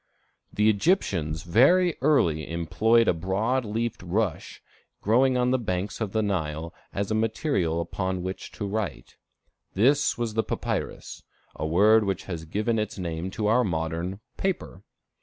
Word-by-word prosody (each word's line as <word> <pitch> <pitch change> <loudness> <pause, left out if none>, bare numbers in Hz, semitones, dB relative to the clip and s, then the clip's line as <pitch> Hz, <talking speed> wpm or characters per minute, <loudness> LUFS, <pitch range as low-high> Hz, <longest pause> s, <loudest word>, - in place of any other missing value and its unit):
The 105 +1 +2
Egyptians 100 - +1
very 160 - +4
early 85 - +2
employed 110 +8 +2
a - - +4
broad 100 +10 0
leafed 115 +2 -2
rush 90 0 -2 0.4
growing 125 +4 +3
on 125 0 +2
the 130 - +2
banks 100 -1 -3
of 105 -3 -2
the 110 +1 +1
Nile, 85 -4 -2 0.2
as 100 +1 -3
a - - +2
material 110 - 0
upon 90 +2 -3
which 95 +1 -6
to 105 - -5
write. 100 -1 -4 0.6
This 135 +9 +3
was 120 -2 -2
the 110 - +2
papyrus, - - -4 0.3
a 80 - -3
word 105 +7 +5
which 95 -2 -2
has 85 -4 -6
given 110 +7 -1
its 110 0 -3
name 85 -1 -3
to 105 +3 -3
our 115 +4 +4
modern 85 +1 -3 0.2
paper. 185 - -3
100 Hz, 150 wpm, -26 LUFS, 85-115 Hz, 0.6 s, word